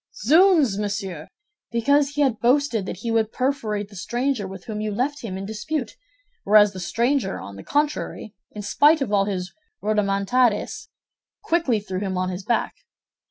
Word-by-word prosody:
"Zounds, 310 Hz, -, +5 dB
monsieur! 195 Hz, -6 st, -4 dB, 0.4 s
Because 280 Hz, +5 st, +2 dB
he 295 Hz, -, +1 dB
had 255 Hz, -6 st, +2 dB
boasted 240 Hz, -4 st, +2 dB
that 185 Hz, -, -6 dB
he 230 Hz, -, -1 dB
would 225 Hz, -1 st, +1 dB
perforate 220 Hz, -6 st, -2 dB
the 205 Hz, -, -14 dB
stranger 240 Hz, +2 st, -2 dB
with 190 Hz, -1 st, -10 dB
whom 215 Hz, -2 st, -4 dB
you 215 Hz, -, -2 dB
left 260 Hz, +8 st, -2 dB
him 190 Hz, -5 st, -5 dB
in 195 Hz, -, -5 dB
dispute; 220 Hz, +5 st, -4 dB, 0.5 s
whereas 210 Hz, -1 st, +5 dB
the 185 Hz, -, -7 dB
stranger, 235 Hz, +3 st, 0 dB
on 100 Hz, -, -9 dB
the 100 Hz, -, -9 dB
contrary, 290 Hz, -7 st, -2 dB, 0.2 s
in 210 Hz, -, -8 dB
spite 295 Hz, +10 st, +4 dB
of 210 Hz, -5 st, -4 dB
all 200 Hz, -1 st, +3 dB
his 185 Hz, -3 st, -4 dB, 0.3 s
rodomontades 210 Hz, -, 0 dB, 0.5 s
quickly 320 Hz, -10 st, +1 dB
threw 190 Hz, -2 st, -5 dB
him 190 Hz, -2 st, -3 dB
on 185 Hz, 0 st, -1 dB
his 185 Hz, +1 st, -6 dB
back. 235 Hz, -, -1 dB
215 Hz, 165 wpm, -23 LUFS, 195-270 Hz, 0.5 s, Zounds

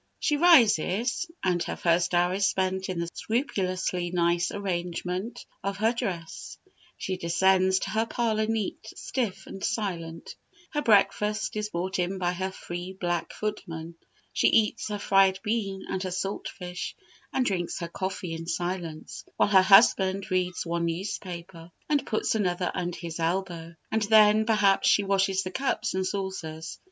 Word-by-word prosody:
"She 295 Hz, -, +1 dB
rises, 245 Hz, -, +4 dB
and 180 Hz, -2 st, +1 dB
her -, -, -2 dB
first 175 Hz, +1 st, +2 dB
hour 175 Hz, +1 st, +3 dB
is 195 Hz, +1 st, +2 dB
spent 190 Hz, -1 st, -1 dB
in 185 Hz, -2 st, -2 dB
the 170 Hz, 0 st, -2 dB
scrupulously 185 Hz, -7 st, -1 dB
nice 170 Hz, -1 st, +1 dB
arrangement 185 Hz, +3 st, -3 dB, 0.2 s
of 195 Hz, 0 st, -2 dB
her 220 Hz, +3 st, +2 dB
dress; 185 Hz, -9 st, -5 dB, 0.4 s
she 185 Hz, -1 st, -3 dB
descends 190 Hz, +2 st, +3 dB
to -, -, -3 dB
her 220 Hz, +1 st, +1 dB
parlour 220 Hz, -3 st, 0 dB
neat, 220 Hz, -3 st, -2 dB
stiff, 230 Hz, -7 st, -3 dB
and 195 Hz, -, -9 dB
silent; 175 Hz, -6 st, -3 dB, 0.4 s
her 295 Hz, -, -1 dB
breakfast 210 Hz, -1 st, +2 dB
is 210 Hz, 0 st, -2 dB
brought 185 Hz, +1 st, -3 dB
in 180 Hz, +2 st, -1 dB
by 180 Hz, -1 st, 0 dB
her 190 Hz, +1 st, -2 dB
free 175 Hz, 0 st, -7 dB
black 175 Hz, -1 st, -1 dB
footman; 170 Hz, -6 st, -5 dB, 0.4 s
she -, -, +3 dB
eats 220 Hz, -2 st, +2 dB
her 210 Hz, -1 st, -3 dB
fried 195 Hz, -1 st, +4 dB
bean 210 Hz, -3 st, -2 dB
and 190 Hz, -, -3 dB
her 190 Hz, -, -2 dB
salt 190 Hz, +2 st, -3 dB
fish, 180 Hz, -1 st, -6 dB, 0.4 s
and 260 Hz, -, +1 dB
drinks 180 Hz, -5 st, -1 dB
her 170 Hz, -, -4 dB
coffee 185 Hz, -1 st, -4 dB
in 165 Hz, 0 st, -6 dB
silence, 175 Hz, -2 st, -4 dB
while -, -, +3 dB
her 190 Hz, -2 st, +7 dB
husband 195 Hz, -1 st, +5 dB
reads 180 Hz, -1 st, 0 dB
one 170 Hz, 0 st, -1 dB
newspaper, 170 Hz, -1 st, -5 dB, 0.2 s
and 290 Hz, -2 st, +1 dB
puts 220 Hz, -, 0 dB
another 180 Hz, -4 st, 0 dB
under 175 Hz, -1 st, -3 dB
his 170 Hz, -1 st, -6 dB
elbow; 170 Hz, -1 st, -2 dB, 0.2 s
and 220 Hz, -, +1 dB
then, 215 Hz, 0 st, +5 dB
perhaps, 210 Hz, -3 st, +4 dB
she 205 Hz, -, +4 dB
washes 195 Hz, -1 st, +1 dB
the 185 Hz, -, -5 dB
cups 265 Hz, +6 st, -1 dB
and 190 Hz, 0 st, 0 dB
saucers. 175 Hz, -5 st, -5 dB
190 Hz, 160 wpm, -27 LUFS, 175-210 Hz, 0.4 s, her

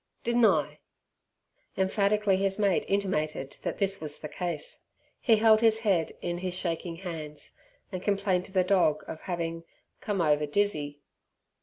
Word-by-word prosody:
Didn' 240 Hz, 0 st, +2 dB
I?" -, -, +2 dB, 1.0 s
Emphatically 200 Hz, +1 st, +2 dB
his 195 Hz, 0 st, 0 dB
mate 200 Hz, -4 st, +2 dB
intimated 155 Hz, -8 st, -1 dB
that -, -, -3 dB
this 195 Hz, 0 st, 0 dB
was 150 Hz, -2 st, -2 dB
the 150 Hz, -, -6 dB
case. 180 Hz, -, -4 dB, 0.4 s
He 230 Hz, -5 st, +4 dB
held 220 Hz, 0 st, +5 dB
his 225 Hz, -1 st, +4 dB
head 190 Hz, -7 st, +2 dB
in 175 Hz, 0 st, -2 dB
his 180 Hz, -1 st, -2 dB
shaking 170 Hz, -1 st, -2 dB
hands, 160 Hz, -5 st, -6 dB, 0.4 s
and 185 Hz, -2 st, -4 dB
complained 195 Hz, -3 st, +1 dB
to -, -, -13 dB
the 185 Hz, -1 st, +3 dB
dog 180 Hz, -5 st, +2 dB
of 160 Hz, -, -7 dB
having 165 Hz, -2 st, -3 dB, 0.4 s
"come 205 Hz, -3 st, -2 dB
ova 150 Hz, -2 st, +2 dB
dizzy". 145 Hz, -5 st, 0 dB
185 Hz, 150 wpm, -28 LUFS, 165-200 Hz, 1.0 s, held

